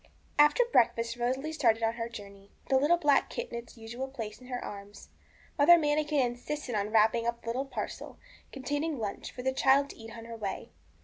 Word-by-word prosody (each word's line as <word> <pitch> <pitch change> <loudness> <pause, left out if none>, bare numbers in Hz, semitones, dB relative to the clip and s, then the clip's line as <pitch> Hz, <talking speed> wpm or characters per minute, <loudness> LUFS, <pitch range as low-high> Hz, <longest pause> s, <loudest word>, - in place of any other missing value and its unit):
After 295 +11 +6
breakfast 230 - +2
Rosalie 260 +6 -2
started 230 -7 +2
on 225 0 +2
her 230 0 -4
journey, 200 -3 -11
with - - -25
the 265 - +6
little 295 +6 +4
black 295 -4 +3
kit 485 0 -5
in - - -5
its 235 0 -14
usual 235 +4 -6
place 225 -4 -7
in 250 - -13
her 250 -1 -4
arms. 200 0 -10 0.5
Mother 340 +5 +8
Manikin 295 -3 +1
insisted 245 +2 -4
on 205 -1 -1
wrapping 225 +1 +3
up 235 0 -3
a - - -17
little 245 +4 -2
parcel, - - -6 0.3
containing 290 +3 -2
lunch, 210 -4 -5
for 250 - -8
the 265 0 +1
child 275 +1 +3
to - - -13
eat 225 0 -10
on 230 - -9
her 230 0 -7
way. 200 -3 -5
245 Hz, 205 wpm, -30 LUFS, 225-285 Hz, 0.5 s, Mother